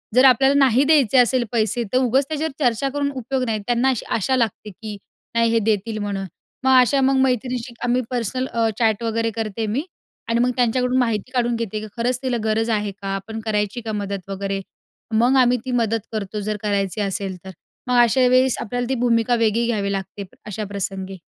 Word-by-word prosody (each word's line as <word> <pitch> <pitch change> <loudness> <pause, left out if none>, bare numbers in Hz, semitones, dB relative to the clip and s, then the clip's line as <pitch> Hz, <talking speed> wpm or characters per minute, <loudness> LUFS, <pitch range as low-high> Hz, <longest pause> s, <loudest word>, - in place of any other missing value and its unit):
जर 255 +2 +7
आपल्याला 270 +2 +5
नाही 260 +1 +3
द्यायचे 280 -5 +4
असेल 250 0 +4
पैसे 225 0 0
तर - - +4
उगाच 260 +2 +2
त्याच्यावर 315 +1 -2
चर्चा 245 +2 +1
करून 285 +1 -1
उपयोग 260 +1 -2
नाही. 220 -3 -1
त्यांना 245 +2 +2
अशी 255 -4 -2
आशा 245 +5 +1
लागते, 225 -3 -1
की 210 +1 -8 0.4
नाही 230 0 +3
हे 230 - +3
देतील 215 0 -1
म्हणून. 200 -1 -3 0.4
मग 260 -1 +6
अशा 265 +3 +3
मग 270 +1 +3
मैत्रिणींशी 250 -1 -1
आम्ही 245 +1 +2
पर्सनल 250 +1 -2
अ, 230 -2 0
चॅट 225 -1 +2
वगैरे 230 0 0
करते 220 -1 -3
मी 240 +8 -1 0.5
आणि 230 0 +2
मग 250 +1 +2
त्यांच्याकडून 250 +1 +1
माहिती 230 0 -1
काढून 240 -1 +1
घेते 225 -2 -3
की 215 - -7
खरंच 245 +1 0
तिला 255 -2 0
गरज 220 +1 0
आहे 210 -2 0
का? 195 0 -9
आपण 215 +3 -6
करायची 210 +1 -1
का 225 -1 -5
मदत 200 -1 -5
वगैरे. 195 0 -3 0.5
मग 240 +4 +3
आम्ही 250 0 +3
ती 260 - -3
मदत 225 -2 +1
करतो 210 -1 -4
जर 210 +1 -2
करायची 200 0 -1
असेल 195 -1 -3
तर. 190 - -7 0.4
मग 250 - +2
अशा 250 +2 +4
वेळेस 255 0 +3
आपल्याला 245 +2 -3
ती 265 - +1
भूमिका 230 0 +2
वेगळी 230 0 +1
घ्यावी 205 -4 -1
लागते 195 +1 -5 0.2
अशा 210 0 -5
प्रसंगी. 195 -1 -4
230 Hz, 195 wpm, -21 LUFS, 210-250 Hz, 0.5 s, जर